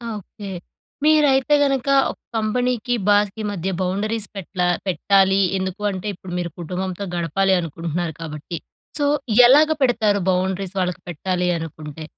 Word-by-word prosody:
Okay. 205 0 -9 0.6
మీరైతే 295 -2 +4
గనక 275 -2 0 0.2
ఒక - - -13 0.2
కంపెనీకి 245 +2 0 0.2
బాస్‌కి 205 +1 +2
మధ్య 190 -1 -3
బౌండరీస్ 210 +4 -1
పెట్లా 180 -1 -2 0.2
పెట్టాలి. 195 +1 +3 0.2
ఎందుకు 190 +1 -4
అంటే, 190 +1 -5
ఇప్పుడు 180 0 -9
మీరు 175 -1 -3
కుటుంబంతో 180 +3 -4
గడపాలి 180 +3 +1
అనుకుంటున్నారు 165 0 -3
కాబట్టి. 155 +1 -6 0.4
సో, 290 - +2 0.4
ఎలాగ 295 +5 +6
పెడతారు 215 -6 +2
బౌండరీస్ 190 +1 -1
వాళ్ళకి 180 -1 -2
పెట్టాలి 180 +2 -1
అనుకుంటే? 155 -1 -7
190 Hz, 125 wpm, -21 LUFS, 175-215 Hz, 0.6 s, ఎలాగ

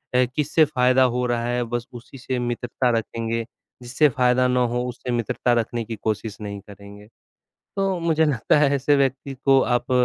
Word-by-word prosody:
अ, 125 0 +4
किससे 155 +2 +3
फ़ायदा 130 -3 +3
हो 125 0 0
रहा 120 -1 -1
है 120 0 0
बस 120 0 -2
उसी 120 +3 -11
से 130 0 -3
मित्रता 120 +1 -2
रखेंगे, 115 0 -3 0.4
जिससे 135 +5 +2
फ़ायदा 125 0 +2
ना 125 0 +1
हो 125 0 -1
उससे 125 +1 -6
मित्रता 120 +1 0
रखने 115 +1 -4
की 115 +1 -5
कोशिश 110 -1 -4
नहीं 100 -1 -6
करेंगे, 100 +1 -13 0.7
तो 195 -2 0
मुझे 160 -1 +2
लगता 145 0 +2
है 145 -2 +4
ऐसे 140 +2 +2
व्यक्ति 135 0 -1
को 135 -1 +6 0.2
आप 120 - -9
125 Hz, 180 wpm, -23 LUFS, 115-135 Hz, 0.7 s, को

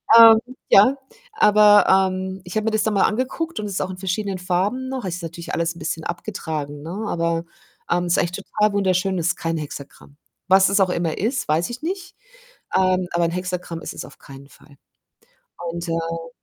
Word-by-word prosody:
Ähm, 225 -1 +10 0.3
ja, 210 +8 +6 0.4
aber, 210 - +6
ähm, 190 0 +1
ich 180 +2 -9
habe 215 0 0
mir 225 - +1
das 220 -1 +1
dann 220 - 0
mal 200 - +3
angeguckt 260 +9 -3
und 210 - -3
ist 200 -2 -3
auch - - -2
in 185 - -7
verschiedenen 190 +1 -2
Farben 190 +8 -1
noch. 260 -4 -4
Ist 180 -1 -4
natürlich 170 +1 -7
alles 170 0 -1
'n - - -12
bisschen 160 0 -4
abgetragen, 160 -5 -5
ne, 165 - -7 0.2
aber, 170 -1 -1 0.4
ähm, 175 0 +1
ist 175 0 +2
eigentlich 175 - 0
total 210 +2 0
wunderschön. 190 -1 +1
Es 170 0 0
ist - - 0
kein 165 0 -2
Hexagramm. 145 -1 -9 0.3
Was 190 0 +5
es 200 +1 +2
auch 190 -2 +3
immer 170 -3 -1
ist, 230 +4 -1
weiß 160 +7 0
ich 245 +3 -7
nicht, 375 +3 -5 0.6
ähm, 185 -1 +2
aber 170 - +1
'n 165 - -1
Hexagramm 180 -2 -4
ist - - -6
es - - -6
auf - - -16
keinen 140 0 -13
Fall 145 - -19 0.9
und, 170 +1 -5
äh 165 0 -3
185 Hz, 195 wpm, -22 LUFS, 170-210 Hz, 0.9 s, Ähm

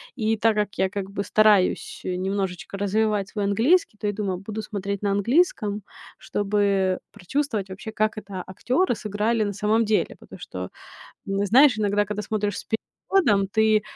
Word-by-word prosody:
И 220 -2 0
так 225 0 +3
как 210 -1 -1
я 190 0 +2
как 195 -1 -4
бы 200 0 -2
стараюсь, 210 -2 +3
э, 180 - -1
немножечко 190 0 -3
развивать 205 0 0
свой 205 -2 -2
английский, 230 - +2
то 210 - -3
я 205 - 0
думаю, 195 -3 -2
буду 210 +3 -5
смотреть 200 -2 -4
на 200 - 0
английском, 210 - +1 0.4
чтобы 200 -2 0
прочувствовать 215 0 -2
вообще, 195 +4 -7
как 215 0 0
это 195 -3 -6
актёры 250 - 0
сыграли 215 +2 0
на 205 -1 -2
самом 215 +3 +2
деле. 215 0 +1
Потому - - -13
что, - - -6 0.6
м, 195 +1 0
знаешь, 250 +3 +6
иногда, 205 0 +2
когда 210 +1 -3
смотришь 205 0 -2
с - - -6
переводом, 220 - 0
ты, 220 +1 +3
205 Hz, 170 wpm, -24 LUFS, 195-220 Hz, 0.6 s, знаешь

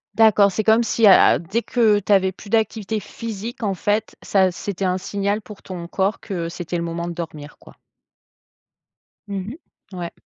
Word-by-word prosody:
D'accord, 215 -2 +5
c'est 215 +3 -2
comme 220 +2 +4
si, 225 0 +2
heu - - +9
heu, - - +6
dès 195 +8 -2
que 220 -5 +2
tu 205 - -4
avais 190 -1 +3
plus 200 +2 -14
d'activité 220 -1 0
physique, 230 +2 -7
en 200 -2 0
fait, 210 +3 -1
ça 190 -2 +3
c'était 195 +2 -4
un 185 0 +1
signal 200 +2 -2
pour 210 -1 -12
ton 175 -2 -7
corps 195 +3 -1
que 175 -5 -4
c'était 175 0 -5
le 170 - -2
moment 170 +1 -4
de - - -5
dormir 155 -4 -8
quoi. - - -17 1.5
Mmh 200 0 -4
mh. 265 - -8 0.4
Ouais. 175 -1 -5
200 Hz, 185 wpm, -21 LUFS, 180-215 Hz, 1.5 s, heu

